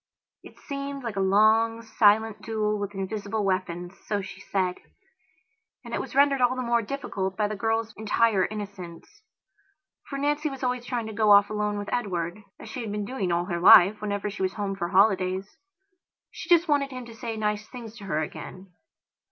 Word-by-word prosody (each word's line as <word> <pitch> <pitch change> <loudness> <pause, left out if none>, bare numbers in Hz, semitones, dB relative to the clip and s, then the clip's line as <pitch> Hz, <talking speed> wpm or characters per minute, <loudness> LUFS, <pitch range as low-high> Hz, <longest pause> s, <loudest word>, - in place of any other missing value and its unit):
It - - -15
seemed 280 -1 -6
like 230 -4 -4
a - - -2
long, 220 +4 +3
silent 220 -1 +3
duel 215 -1 -1
with 200 0 -5
invisible 200 +2 -3
weapons, 180 -1 -2
so 205 - 0
she 190 -1 -8
said. 185 -2 -1 1.1
And - - -8
it - - 0
was - - -9
rendered 280 -1 +4
all 250 +1 +3
the 255 - -3
more 235 -1 +2
difficult 200 -6 -4
by 210 - +1
the 215 - -4
girl's 225 +1 -1
entire 215 -2 +2
innocence. 200 -5 -9 0.9
For 275 - -4
Nancy 295 +2 0
was 270 -1 -8
always 250 -1 -1
trying 245 -2 -2
to 220 - -6
go 215 0 +2
off 205 0 +6
alone 210 -1 -1
with 205 0 -5
Edwardas 185 -5 -2 0.2
she 255 - -6
had 220 -3 -5
been 210 0 -3
doing 200 -6 -2
all 170 +1 +1
her 175 -2 -3
life, 190 +4 +7
whenever 205 0 -2
she 200 - -8
was 190 0 0
home 200 -2 -3
for 175 -3 -3
holidays. 190 - +2 0.8
She - - -9
just 345 0 +5
wanted 285 -2 +2
him 255 -2 -7
to 235 - -11
say 225 -1 -5
nice 210 0 -2
things 230 -3 -10
to 205 - -10
her 155 -5 -1
again. 185 +4 -9
210 Hz, 190 wpm, -26 LUFS, 195-235 Hz, 1.1 s, life